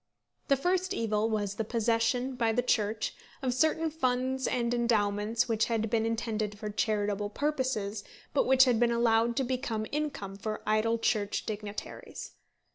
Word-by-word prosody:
The 275 - +4
first 370 +5 0
evil 220 -1 0
was 205 -3 -1
the 225 - 0
possession 230 +3 +1
by 230 -3 +1
the 245 +2 +1
Church 215 -3 0 0.3
of 255 -2 +1
certain 315 +4 +2
funds 260 -2 0
and 240 -1 0
endowments 225 -1 +1
which 225 -2 +2
had 225 -2 -1
been 225 -1 +2
intended 220 -2 -2
for 210 0 -5
charitable 205 -1 0
purposes, 255 -6 -1 0.3
but 285 - +2
which 265 0 +7
had 245 -3 +2
been 240 0 +3
allowed 235 0 +3
to 270 - +1
become 240 -4 -2
incomes 280 -10 -3
for 215 0 -4
idle 215 +2 +2
Church 210 -3 0
dignitaries. 210 -1 -6
230 Hz, 155 wpm, -30 LUFS, 215-255 Hz, 0.3 s, which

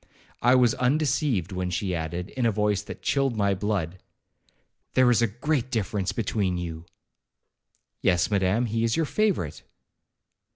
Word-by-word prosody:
I 125 +2 +5
was 125 -3 +4
undeceived, 135 - +1
when 90 -1 -2
she 90 +2 -2
added, 85 +3 -4
in 125 -3 0
a - - +3
voice 105 -1 +1
that 105 - -10
chilled 135 -4 +1
my 100 -1 +2
blood, 95 -3 -2 1.0
'There 130 -1 +5
is 120 - +3
a 115 - +4
great 125 +4 -1
difference 105 -5 -1
between 100 -4 -1
you.' 85 -1 -6 1.1
'Yes, 90 +2 +2
Madam, 100 +4 +2
he 115 0 -1
is 115 0 +1
your 165 - +2
favourite.' 185 - -1
105 Hz, 150 wpm, -26 LUFS, 90-125 Hz, 1.1 s, I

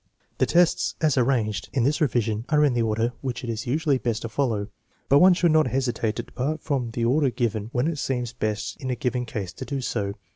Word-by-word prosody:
The - - +3
tests 175 0 +2
as 155 -4 +2
arranged 120 -6 0
in 130 - +1
this 145 +6 +1
revision 115 -6 +1
are 150 -1 +4
in 140 - +2
the 120 - +1
order 115 +2 0
which 130 -3 -4
it 120 - -2
is 110 0 -5
usually 145 +1 +1
best 115 -3 -2
to 115 - -4
follow, 110 -5 -1 0.4
but 140 - +6
one 185 +1 +7
should 175 -2 +3
not 155 0 +4
hesi 130 -2 0
tate 110 -1 -2
to - - -3
depart 145 +4 -3
from 135 -6 -1
the 115 +1 -2
order 135 +3 +3
given 110 -3 -2
when 125 +2 0
it 165 -3 -2
seems 125 -3 -2
best 110 0 -3
in 130 - -4
a 125 - 0
given 125 -2 -2
case 100 -6 -5
to - - -7
do 140 -2 -3
so. 100 -6 -2
125 Hz, 240 wpm, -25 LUFS, 115-140 Hz, 0.4 s, one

